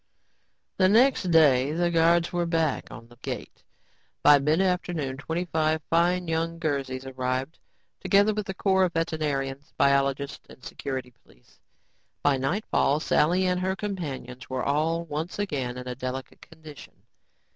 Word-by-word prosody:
The 185 -1 +4
next 230 -3 +4
day 145 -4 +4
the 175 +1 +1
guards 170 +1 +3
were 175 -1 0
back 165 -4 0
on 115 - -11
the 120 0 -19
gate. 125 - -7 0.6
By 145 -1 +7
midafternoon 160 -3 0
twelve 160 -1 -1
fine 175 +2 +2
young 165 +1 -1
Guernseys 135 -5 -3
arrived, 130 +3 -3 0.4
together 205 +2 +3
with 210 -2 -4
a - - -1
corps 190 -1 +3
of 175 - -3
veterinarians, 145 -4 -2
biologists 140 0 +1
and 130 - -15
security 130 -3 -5
police. - - -25 0.6
By 145 -2 +3
nightfall, 145 0 0
Sally 175 +4 +2
and 180 0 +1
her 190 +1 -1
companions 140 - -6
were 130 -1 -2
all 160 +4 0
once 160 +2 -4
again 135 -11 -3
in 125 0 -7
a 125 - -3
"delicate 130 +1 -6
condition." 155 -2 -14
155 Hz, 140 wpm, -26 LUFS, 135-175 Hz, 0.6 s, By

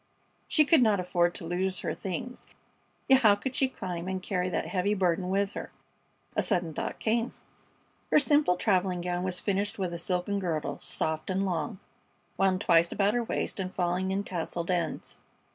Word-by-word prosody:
She 305 - +4
could 315 -2 +5
not 215 -4 +4
afford 175 -1 +1
to 180 - -6
lose 185 +2 -1
her - - -2
things. 195 +7 -5 0.6
Yet 265 0 +6
how 210 -3 +6
could 225 +6 -4
she 265 - +2
climb 180 -8 -5
and 190 0 -2
carry 185 -1 -1
that - - -1
heavy 200 +2 0
burden 180 -1 +1
with 195 +1 +1
her? - - -7 0.6
A - - +3
sudden 170 -3 0
thought - - -4
came. 230 +2 0 0.7
Her - - +5
simple 290 -8 +4
traveling 185 -2 +1
gown 175 0 -2
was 185 -1 0
finished 200 0 -1
with 185 -3 -2
a 170 - -2
silken 180 +3 -1
girdle, 165 -5 -2
soft 155 +2 -1
and 190 +1 0
long, 170 -2 -2 0.6
wound 190 -1 +2
twice 170 -1 +4
about 205 +1 +2
her 240 0 +1
waist 225 - -2
and 185 -1 -3
falling 180 0 -1
in 195 +1 -1
tasseled 170 -1 -3
ends. 170 -3 -2
185 Hz, 180 wpm, -29 LUFS, 175-205 Hz, 0.7 s, Yet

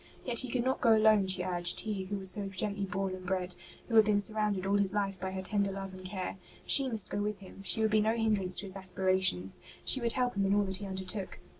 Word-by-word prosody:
Yet 240 -2 +4
he 260 - +2
could 240 0 -1
not 260 +1 -1
go 230 -3 +5
alone, 215 -2 +3
she 185 -1 +2
urged, 175 -1 0
he 205 -3 -4
who 200 +2 -5
was 190 -1 +3
so 205 -2 -2
gently 200 +1 -3
born 195 0 -3
and 185 0 -8
bred, 185 -1 -3 0.3
who 235 - -7
had 220 - +7
been 205 -1 +2
surrounded 210 -2 +2
all 200 +1 +1
his 200 0 -1
life 195 -2 -2
by 190 - -4
her 190 0 -6
tender 200 +1 -1
love 195 0 -7
and 185 0 -11
care. 185 0 -6 0.3
She 270 -2 +7
must 220 -4 -2
go 205 - -2
with 210 0 -3
him; 195 0 -13
she 195 +3 +1
would 220 - +1
be 215 0 +3
no 220 +2 0
hindrance 210 -5 -1
to - - -9
his 190 -1 0
aspirations; 185 - 0 0.2
she 265 - +5
would 235 -1 +4
help 250 -1 -1
him 195 -1 0
in 200 - +2
all 205 - +2
that 190 -1 -2
he 200 +1 -7
undertook. 190 +1 -5
195 Hz, 265 wpm, -30 LUFS, 190-215 Hz, 0.3 s, had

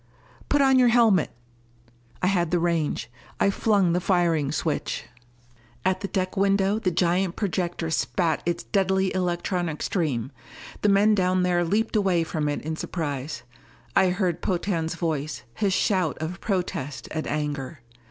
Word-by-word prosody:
"Put 290 -1 +4
on 265 -1 +5
your 250 - +6
helmet!" 230 -8 +4 0.9
I - - +4
had 180 -3 +2
the 175 - +2
range. 165 -7 0 0.3
I 200 - +3
flung 200 -4 +2
the 180 - +1
firing 170 -6 +2
switch. - - -2 0.8
At 185 0 +1
the 200 - -2
deck 185 -1 -2
window 195 +1 +2
the 195 - +1
giant 180 +1 +1
projector 175 -4 -2
spat 160 0 0
its 175 0 -2
deadly 190 -1 +1
electronic 175 -3 -1
stream. 140 - -1 0.5
The 210 - +3
men 205 +2 +5
down 185 -2 +2
there 175 -1 +2
leaped 215 +7 0
away 190 -5 +2
from 155 -2 -2
it 145 - -3
in 160 +1 -3
surprise. 145 -7 -4 0.5
I 185 - +5
heard 180 -2 -1
Potan's 170 -3 -1
voice, 155 -4 -3
his 195 - 0
shout 185 -4 +1
of 160 +3 -5
protest 175 - -3
and 155 0 -3
anger. 145 -2 -3
180 Hz, 150 wpm, -25 LUFS, 160-195 Hz, 0.9 s, your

